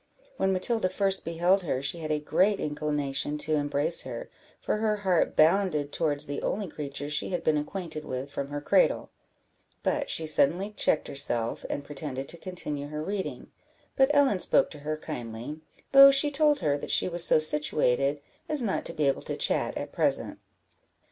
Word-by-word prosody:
When 190 - +1
Matilda 190 +2 0
first 195 +1 0
beheld 175 +4 +1
her 145 -7 -2
she 140 +5 -2
had 155 -1 -5
a 150 - +1
great 190 +7 +1
inclination 150 -1 -2
to 155 +1 -1
embrace 145 +2 +2
her, - - -8 0.3
for - - -2
her 215 0 0
heart 180 -3 +2
bounded 155 -3 +2
towards 150 -2 0
the 145 -1 -5
only 205 -1 -2
creature 145 -2 -6
she 150 0 0
had 180 - -3
been 155 - +2
acquainted 155 +1 -4
with 130 0 -6
from 140 - -4
her 145 0 -5
cradle; - - +2 0.7
but 285 -2 -1
she 160 - +2
suddenly 175 +6 +1
checked 180 -6 0
herself, 120 -5 -2
and 145 - -4
pretended 140 -2 -5
to 170 - -4
continue 150 -6 -5
her 150 +1 -5
reading; 195 +2 -5 0.4
but 270 0 +4
Ellen 280 -9 +3
spoke - - +2
to 150 - -8
her 155 +1 -4
kindly, 125 -1 -7 0.3
though 275 0 +10
she 275 +2 +4
told 295 0 +2
her 145 -1 0
that - - -7
she - - +3
was 175 -1 +3
so - - +6
situated, 145 -2 +2 0.3
as 300 -4 +1
not 200 -4 -2
to - - -2
be 150 -3 0
able 135 - 0
to - - -5
chat - - 0
at - - -6
present. - - 0
155 Hz, 180 wpm, -27 LUFS, 145-190 Hz, 0.7 s, though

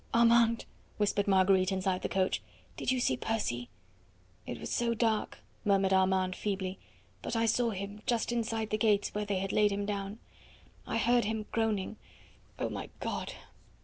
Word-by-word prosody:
"Armand," 230 0 +5 0.3
whispered 205 -1 +1
Marguerite 190 -1 +4
inside 190 -1 0
the - - -2
coach, 190 0 +1 0.3
"did - - -1
you 260 - +1
see 130 - +2
Percy?" 125 - -2 0.8
"It 120 - -5
was - - -6
so 235 -1 +1
dark," 220 -2 0 0.2
murmured 195 -1 +3
Armand 190 -1 +3
feebly; 190 -2 -3 0.4
"but - - -3
I 230 0 +2
saw 230 +1 +2
him, 200 0 -5
just 235 -1 +1
inside 225 -2 -1
the 215 - 0
gates, 205 -2 +2
where 210 0 -1
they 200 -2 -1
had 195 +1 -2
laid 210 -1 +4
him 200 0 -1
down. 200 0 -3 0.7
I - - -1
heard 240 0 +3
him 220 0 -2
groaning. 220 -2 0 0.6
Oh, - - -1
my - - -5
God!" - - -3
205 Hz, 165 wpm, -31 LUFS, 190-225 Hz, 0.8 s, Armand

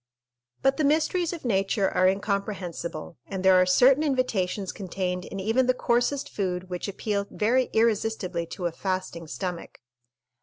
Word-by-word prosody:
But 270 0 +3
the 310 - +1
mysteries 315 +4 +2
of 335 -6 -7
nature 195 -2 +1
are 185 0 +3
incomprehensible, 190 -4 -3
and 190 -1 -4
there 190 - +7
are 185 - +3
certain 255 +10 +5
invitations 220 -10 0
contained 180 -2 -3
in 195 - -6
even 225 +6 +1
the 255 - +3
coarsest 245 +4 +1
food 185 -2 -3
which 180 +2 -3
appeal 200 0 -2
very 250 +4 +2
irresistibly 215 -6 0
to 180 +1 -6
a 170 - 0
fasting 185 -2 -4
stomach. 180 +1 -5
200 Hz, 150 wpm, -26 LUFS, 185-245 Hz, -, there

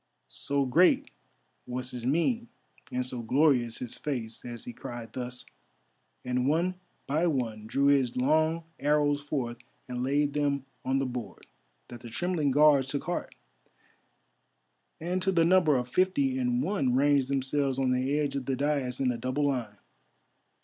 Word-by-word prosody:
So 140 -1 -1
great 165 +8 +3 0.6
was 125 +1 -3
his 125 -1 -4
mien 225 - +1 0.4
and 125 0 -1
so 125 -1 -4
glorious 125 -1 +2
his 125 -2 -6
face 120 -6 -4
as 120 -2 -7
he 120 - -7
cried 120 -2 -8
thus, 125 0 -6 0.8
and 125 +1 0
one 170 +5 +2 0.3
by 155 +5 +1
one 115 -8 -2
drew 140 +5 +1
his 135 -4 +3
long 155 +5 +2 0.2
arrows 145 0 +2
forth 130 -5 -3 0.3
and 125 -1 -4
laid 140 +2 +1
them 140 -2 0 0.2
on 130 +1 +1
the 135 - 0
board, 120 -6 -6 0.4
that 120 - -9
the 120 - -10
trembling 170 +3 0
Guards 145 -1 +5
took 140 +1 -2
heart, 175 - -4 1.6
and 180 +3 -2
to 190 - +1
the 165 -3 +3
number 170 -5 +4
of 125 0 -2
fifty 190 - +1
and 245 0 +1
one 140 - +1
ranged 140 -1 +3
themselves 135 0 0
on 130 -1 +1
the 130 +3 +1
edge 145 -2 -1
of 135 -3 -3
the 135 - +1
daïs 140 -2 -1
in 130 -2 +2
a 120 - -4
double 130 +4 -1
line. 115 -6 -3
135 Hz, 160 wpm, -29 LUFS, 125-150 Hz, 1.6 s, Guards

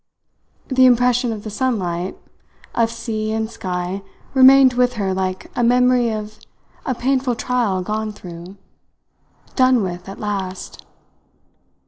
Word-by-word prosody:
The 260 -1 +5
impression 245 0 +3
of 215 -2 -6
the 215 - -6
sunlight, 190 -7 -2 0.6
of 230 -1 +2
sea 225 -2 -4
and 220 0 -1
sky, 185 -3 -4 0.3
remained 265 0 +7
with 250 0 +2
her 200 -5 -1
like 185 0 -3
a 245 - 0
memory 250 0 +3
of 215 0 -6 0.5
a 260 - 0
painful 260 0 0
trial 225 -7 -1
gone 215 +2 -3
through 180 -1 -11 1.0
done 255 -4 +4
with 180 0 -5
at 195 - -9
last! 195 -3 -5
220 Hz, 125 wpm, -20 LUFS, 190-250 Hz, 1.0 s, remained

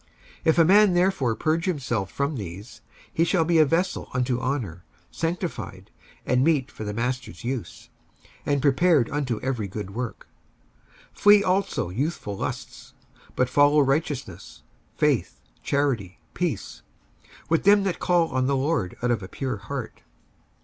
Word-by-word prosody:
55:002:021 - - -35 0.4
If 160 - +4
a 165 - +6
man 200 +2 +6
therefore 175 -10 +2
purge 160 +5 0
himself 125 - -2
from 140 +2 -1
these, 100 +2 -8 0.3
he 165 - +2
shall 170 -1 +2
be 165 0 +3
a 155 - +7
vessel 170 +5 -1
unto 125 0 0
honour, 120 - -3 0.3
sanctified, 165 - -4 0.3
and 125 +1 +2
meet 145 -4 +2
for - - -8
the 105 - -3
master's 125 +3 -3
use, 125 -1 -5 0.5
and 140 -2 0
prepared 145 -1 +3
unto 135 -6 -1
every 120 -6 -2
good 100 0 -6
work. 125 +1 -5 0.9
55:002:022 - - -20
Flee 205 0 +7
also 185 - 0
youthful 125 - -3
lusts: - - -6 0.4
but 125 - +2
follow 145 +3 +4
righteousness, 140 0 -2 0.3
faith, - - +1 0.2
charity, 130 -10 -1
peace, - - -3 0.7
with 165 0 +2
them 200 0 +6
that 190 -3 -2
call 175 -2 +2
on 130 -1 0
the 140 0 +1
Lord 130 - -1
out 125 - +2
of 115 - 0
a 95 - -7
pure 125 +1 -4
heart. 115 +3 -6
135 Hz, 150 wpm, -25 LUFS, 120-165 Hz, 0.9 s, a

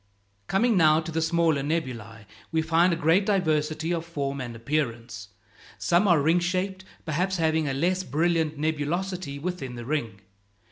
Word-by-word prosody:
Coming 230 +4 +2
now 155 -3 +5
to 165 +1 -5
the 165 +1 -1
smaller 160 -2 +2
nebulæ, 125 -8 -4 0.3
we 160 -1 +1
find 165 +3 +3
a - - +1
great 165 +4 +3
diversity 160 -5 0
of 165 -1 -2
form 140 -5 -4
and 120 -2 -6
appearance. 115 -4 -3 0.5
Some 175 +4 +2
are 175 -4 +5
ring 165 +4 +3
shaped, 185 +2 -2 0.2
perhaps 180 +5 -1
having 160 -2 +1
a 135 - -1
less 180 +6 0
brilliant 160 +1 0
nebulosity 160 +1 -2
within 145 -5 -5
the 120 -1 -7
ring. 115 -8 -3
160 Hz, 155 wpm, -26 LUFS, 140-175 Hz, 0.5 s, now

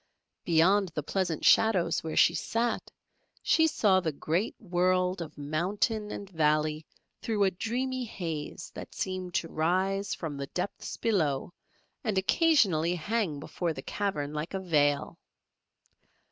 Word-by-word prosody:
Beyond 180 +4 +4
the 150 - -2
pleasant 175 -1 -1
shadows 180 -7 +4
where 160 -1 -4
she 170 - +6
sat, 230 +5 -1 0.5
she 320 -1 +4
saw 200 -10 +3
the 165 -4 -1
great 165 +8 -1
world 185 -1 +1
of 155 -2 -8
mountain 195 - -1
and 200 - -6
valley 155 -2 +1 0.3
through 215 -3 0
a 190 - +3
dreamy 250 +6 -2
haze 165 -8 -5
that - - -9
seemed 185 -2 -4
to 165 - 0
rise 185 +5 0
from 155 -4 -5
the 140 0 -4
depths 180 +7 -4
below 170 -9 0 0.5
and 210 -3 -1
occasionally 190 - +3
hang 180 -3 -1
before 170 +3 -3
the 135 - -8
cavern 150 -8 -2
like 150 +5 -4
a - - -1
veil. 145 -6 +1
180 Hz, 135 wpm, -29 LUFS, 155-200 Hz, 0.5 s, she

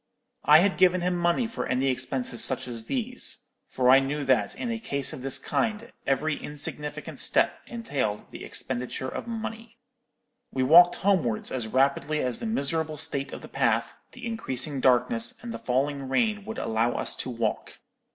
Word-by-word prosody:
I 150 +2 +8
had 195 0 +1
given 185 -1 +4
him 180 0 0
money 175 +7 +1
for 225 0 -4
any 130 +1 0
expenses 130 -2 +1
such 130 -1 +1
as 115 -2 -5
these; 250 - -3 0.2
for 125 -1 +3
I 135 - +8
knew 140 +2 -2
that, 130 -2 +1
in 240 - -3
a 230 - -3
case 140 -10 -2
of - - -7
this 135 0 0
kind, 225 0 -2 0.2
every 150 +3 +1
insignificant 150 0 -5
step - - +3
entailed 145 - -3
the - - -9
expenditure 125 0 -4
of - - -6
money. 225 0 -6 0.7
"We 130 - 0
walked 175 +6 +7
homewards 175 - 0
as 125 -4 -2
rapidly 140 +5 +1
as 125 -3 -1
the 230 - -4
miserable 160 -5 -1
state 140 -1 0
of - - -8
the - - -8
path, - - 0 0.2
the 250 -1 -9
increasing 145 - -2
darkness, 180 - +2
and 235 -1 -5
the - - -6
falling 135 +2 -1
rain 210 - +1
would 220 +1 -6
allow 115 +2 0
us - - +2
to - - -3
walk. 115 -3 -3
145 Hz, 175 wpm, -26 LUFS, 130-210 Hz, 0.7 s, I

